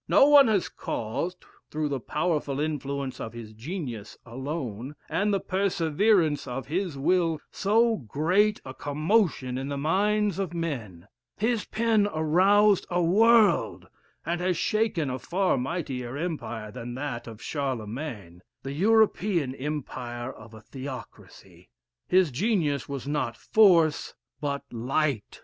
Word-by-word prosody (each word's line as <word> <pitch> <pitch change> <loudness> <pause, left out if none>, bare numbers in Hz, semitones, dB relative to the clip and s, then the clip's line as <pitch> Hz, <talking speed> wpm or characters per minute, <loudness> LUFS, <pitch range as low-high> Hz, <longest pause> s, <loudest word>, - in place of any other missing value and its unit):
No - - +6
one 290 -3 +8
has 205 -5 +2
caused, 140 +12 -4 0.2
through 155 -1 -2
the 140 -2 -2
powerful 150 0 -1
influence 140 -3 -3
of 110 - -6
his 115 -2 -9
genius 120 - -6
alone, 130 0 -5
and 205 +3 0
the 200 - +2
perseverance 185 -3 +1
of 125 +2 -4
his 170 0 -2
will, 165 +1 +1
so 225 +3 +2
great 175 - +1
a 130 - -7
commotion 150 - 0
in 135 - -4
the 140 0 -3
minds 200 +6 +1
of 180 -3 -3
men; 115 - -4 0.3
his 225 +1 0
pen 220 -2 +2
aroused 190 +6 +4
a 175 - 0
world, 220 +5 +4 0.4
and 170 +1 -1
has 180 -1 0
shaken 195 - 0
a 130 - -4
far 185 +5 +1
mightier 130 -3 -3
empire 120 -10 -4
than 120 +3 -7
that 130 -4 -5
of 110 -2 -9
Charlemagne, 120 - -5 0.2
the 135 +1 -5
European 195 -5 +2
empire 130 -4 -5
of 110 +1 -13
a 110 - -12
theocracy. 130 +3 -10 0.4
His 185 -4 +3
genius 155 - 0
was 140 -1 -5
not 145 -6 -2
force 170 -8 +4 0.3
but 140 -1 -2
light. 125 0 -1
150 Hz, 130 wpm, -27 LUFS, 130-190 Hz, 0.4 s, one